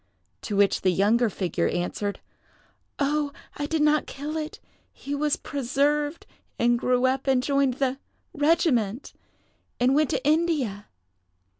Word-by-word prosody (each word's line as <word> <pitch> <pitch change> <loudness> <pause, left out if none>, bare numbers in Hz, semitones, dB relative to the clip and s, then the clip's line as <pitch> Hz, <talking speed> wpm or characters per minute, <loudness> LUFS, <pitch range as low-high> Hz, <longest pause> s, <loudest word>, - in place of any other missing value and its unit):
To 210 - -4
which 200 0 +3
the 190 - +3
younger 215 +6 +3
figure 185 -3 -1
answered, 195 +3 -3 0.8
"Oh, 290 +1 0 0.3
I 290 - -2
did 315 -1 +1
not 300 0 +3
kill 295 +3 -6
it. 310 0 -4 0.3
He 280 - -7
was 295 0 +1
preserved, 290 +3 -1 0.3
and 240 0 +2
grew 250 0 +2
up, 265 +1 0
and 260 -2 +3
joined 275 -2 +1
the 270 0 -1 0.2
—— - - -46
regiment, 290 - +1 0.7
and 250 +2 +3
went 300 0 +3
to - - -2
India." 295 -11 +1
275 Hz, 140 wpm, -25 LUFS, 235-295 Hz, 0.8 s, which